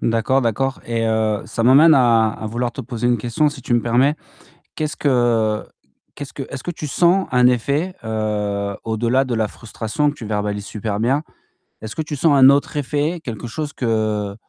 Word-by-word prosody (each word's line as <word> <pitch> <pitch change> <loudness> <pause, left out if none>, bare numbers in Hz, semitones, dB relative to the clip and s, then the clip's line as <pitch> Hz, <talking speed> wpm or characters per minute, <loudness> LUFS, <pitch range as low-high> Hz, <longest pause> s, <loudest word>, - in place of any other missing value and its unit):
D'accord, 115 +4 +1
d'accord 130 +4 -1
et 115 -1 -1
heu, 110 -1 0
ça 115 - -3
m'amène 145 +6 +7
à 115 -4 +4
à 110 - -7
vouloir 120 +2 -2
te - - -6
poser 120 -1 -4
une 120 -1 +2
question 120 +7 +1
si 145 -4 -8
tu - - -3
me 120 - +3
permets: 130 +6 +2 0.6
qu'est-ce 155 -1 -3
que 120 -5 +1 0.5
qu'est-ce 145 -2 -8
que 135 - -5
est-ce 140 - -7
que - - -4
tu 155 - -7
sens 175 +6 +2
un 125 -1 +5
effet, 140 +9 0
heu, 105 -2 -2
au-delà 115 +4 +1
de 125 - -3
la 110 -1 0
frustration 115 +7 -3
que 145 - -5
tu 115 - -9
verbalises 105 -1 -2
super 105 -1 -4
bien? 135 +7 +1 0.6
Est-ce 110 - -7
que 160 - -2
tu 150 -1 -4
sens 150 +2 +3
un 130 0 +8
autre 140 +1 +1
effet, 150 +4 -1
quelque 120 0 -6
chose 145 +4 -5
que 110 -4 -1
120 Hz, 195 wpm, -20 LUFS, 110-140 Hz, 0.6 s, un